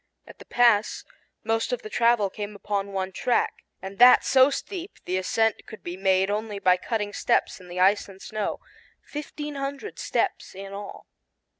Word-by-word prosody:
At - - -15
the - - -12
pass, 230 -3 +3 0.4
most 225 +1 0
of 245 -1 -2
the 215 - -7
travel 230 -4 +3
came 210 0 -6
upon 200 0 -3
one 190 -1 -3
track, 245 +6 +1 0.3
and 195 +2 -8
that 250 +1 +8
so 260 +1 +6
steep 360 +6 -5
the 185 - -1
ascent 225 +4 0
could 220 - -11
be 175 - -5
made 190 +1 +2
only 210 0 -3
by 185 -2 +4
cutting 210 +1 -3
steps - - 0
in 180 - -14
the 180 +1 -6
ice 200 +2 +3
and 190 -1 -13
snow 215 +1 -4 0.4
fifteen 295 0 -6
hundred 280 +8 -5
steps - - -2
in 195 +1 -8
all. 200 0 -8
210 Hz, 175 wpm, -25 LUFS, 195-240 Hz, 0.4 s, that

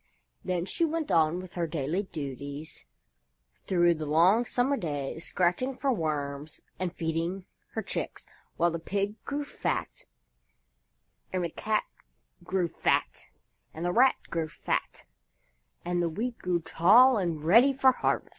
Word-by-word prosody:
Then 180 -1 -1
she 335 - -1
went 325 -1 -1
on 160 +1 +3
with 185 -1 -9
her 170 -2 -1
daily 155 +3 -1
duties 145 - -7 0.8
through 175 -2 +4
the 155 -2 -5
long 180 +10 +4
summer 255 +3 +1
days, 150 - -4
scratching 185 +10 0
for 275 -2 +1
worms 150 -4 -3 0.2
and 185 -2 -1
feeding 170 +3 -3 0.3
her - - -2
chicks, - - -4 0.3
while 170 +1 +3
the 165 - -3
Pig 200 +5 -3
grew 285 +1 -2
fat, - - -3 1.3
and 185 -1 -1
the 170 - -1
Cat 215 -1 0 0.6
grew 180 0 0
fat, - - -1 0.5
and 165 +2 -4
the 175 - 0
Rat 260 +5 +5 0.2
grew 165 -1 -1
fat, - - -3 0.8
and 175 0 0
the 170 - +1
Wheat 230 +8 -4
grew 175 -2 0
tall 215 +11 +6
and 170 -6 -2
ready 230 - +6
for 265 -1 +5
harvest. - - -1
175 Hz, 145 wpm, -28 LUFS, 160-215 Hz, 1.3 s, tall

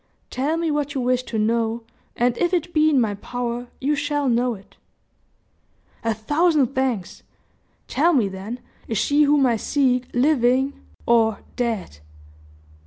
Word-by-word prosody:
Tell 290 +6 -1
me 330 -1 0
what 290 -1 -2
you 265 - 0
wish 250 0 +1
to 225 - -4
know, 225 +1 0 0.3
and 240 0 +1
if 350 +1 +2
it 345 0 -2
be 310 -1 +4
in 285 -4 +3
my 220 -4 +1
power, 245 +3 -4
you 290 +3 +1
shall 290 -1 -1
know 240 0 +1
it." 195 -1 -17 1.3
"A 225 -1 0
thousand 295 +3 +2
thanks! 255 -9 -2 0.7
Tell 330 +5 +2
me, 250 -10 +3
then, 195 +6 -7 0.3
is 225 - -2
she 290 +7 +2
whom 290 -1 +4
I 235 -3 +2
seek 255 0 +1
living 260 0 +2 0.3
or 225 -3 +3
dead?" 225 - -3
250 Hz, 150 wpm, -22 LUFS, 230-290 Hz, 1.3 s, be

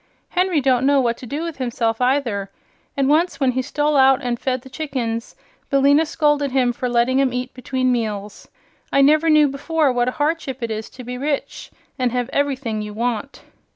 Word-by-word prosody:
Henry 360 -3 +1
don't 260 -1 +2
know 285 0 +4
what 235 -3 +1
to 250 - -10
do 290 +7 -3
with 335 -3 -5
himself 240 -2 -1
either, 250 -7 0 0.5
and 275 -1 +2
once 305 0 +2
when 265 -3 +2
he 260 +1 -1
stole 295 +3 0
out 265 -1 +5
an' 245 -1 0
fed 255 0 -2
the - - -12
chickens 250 -7 -4 0.3
Billina 285 +3 +4
scolded 295 -3 +1
him 255 -2 +1
for 250 +1 -3
letting 245 +3 +2
'em 265 -2 +1
eat 250 +1 -4
between 255 0 -1
meals. 210 -4 -3 0.4
I 275 - +4
never 305 +4 +4
knew 305 -1 +6
before 285 +1 0
what 245 0 +1
a 255 - -8
hardship 290 -4 -2
it 230 - -2
is 220 0 -5
to 255 - -11
be 250 +1 -6
rich 285 0 -3 0.3
and 250 -1 +1
have 250 +1 -2
everything 265 -6 -1
you 210 0 -7
want." 240 +3 -3
260 Hz, 195 wpm, -21 LUFS, 245-285 Hz, 0.5 s, knew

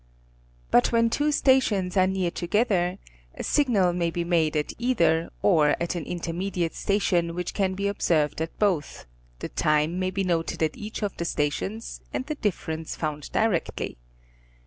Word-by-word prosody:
But 120 - +4
when 230 -1 +3
two 295 +4 +1
stations 225 -10 +2
are 185 -1 +4
near 190 -2 0
together 185 -1 +1 0.4
a - - -5
signal 215 -12 +2
may 170 -1 0
be 170 +1 -2
made 165 -3 +1
at 150 - -2
either 170 -10 +2
or 155 -6 +4
at 170 +1 -1
an 170 -4 -4
intermediate 175 0 -2
station, 175 -4 0
which 180 0 -3
can 190 -2 0
be 200 +1 -1
observed 160 -7 +1
at 160 - -4
both, 185 -8 0 0.4
the - - -4
time 155 +3 +1
may 185 0 0
be 195 +1 -1
noted 165 -3 -1
at 155 - 0
each 215 +1 -6
of 205 - -2
the 170 - -2
stations 170 +9 -2
and 255 - -3
the 305 - -3
difference 165 - -3
found 150 -2 -4
directly. 210 - -1
180 Hz, 165 wpm, -26 LUFS, 165-205 Hz, 0.4 s, But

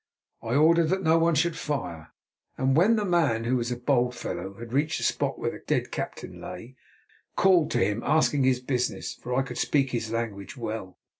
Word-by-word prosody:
I 115 +2 -2
ordered 165 +2 +5
that 190 +1 0
no 160 0 +4
one 165 0 +3
should 170 +3 +1
fire, 90 - -4 0.5
and 130 0 +2
when 195 +9 +5
the 210 -2 0
man, 160 - +2
who 120 +2 +1
was 120 0 -1
a - - 0
bold 125 -1 +1
fellow, 95 -3 -5
had 115 +2 -9
reached 150 +3 +1
the - - -4
spot - - 0
where - - -2
the - - -9
dead - - -1
captain - - -6
lay, 125 +3 -9 0.6
called 180 -5 +4
to - - +2
him, 105 +3 -1
asking 150 -2 +2
his 130 -1 +2
business, 125 -1 -2
for 125 0 -5
I 135 - +2
could - - -6
speak 135 -3 +1
his 115 -2 -3
language 115 -2 -4
well. 110 -6 -5
130 Hz, 205 wpm, -27 LUFS, 115-160 Hz, 0.6 s, ordered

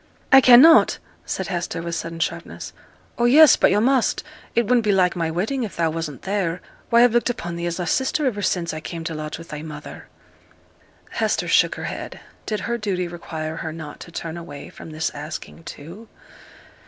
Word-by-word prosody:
'I 270 0 +9
cannot,' 260 +7 +7 0.3
said 190 - -3
Hester, 175 -2 -3
with 170 0 -4
sudden 165 0 -4
sharpness. 165 - -4 0.5
'Oh, 240 - +3
yes, 295 +4 +8
but - - +4
yo' 205 - +3
must. 255 +2 +2 0.3
It 235 - +4
wouldn't 240 +2 +3
be 210 - +2
like 185 -2 +2
my 165 -2 -1
wedding 215 +12 -2
if 220 -6 -4
thou 165 -1 0
wasn't 160 -4 -5
there: 190 -3 -1 0.3
why 235 +1 +6
I've 245 -2 +4
looked 240 +1 +2
upon 175 -8 -4
thee 170 0 -3
as 170 +1 -3
a 175 - -2
sister 265 - 0
iver 215 -6 -1
since 175 -3 -1
I 155 - -5
came 165 +1 -7
to 165 0 -4
lodge 155 -1 -5
with 165 0 -12
thy 150 0 -6
mother.' 150 -1 -9 1.0
Hester - - -1
shook - - +3
her - - -7
head. - - -6 0.3
Did 215 -1 -2
her 235 0 -2
duty 185 -4 -2
require 160 -2 -6
her 160 - -4
not 155 -2 -9
to 170 - -11
turn 165 0 -6
away 145 -4 -9
from - - -11
this 155 0 -3
asking, 155 +2 -8
too? 175 +10 -10
175 Hz, 200 wpm, -22 LUFS, 165-225 Hz, 1.0 s, I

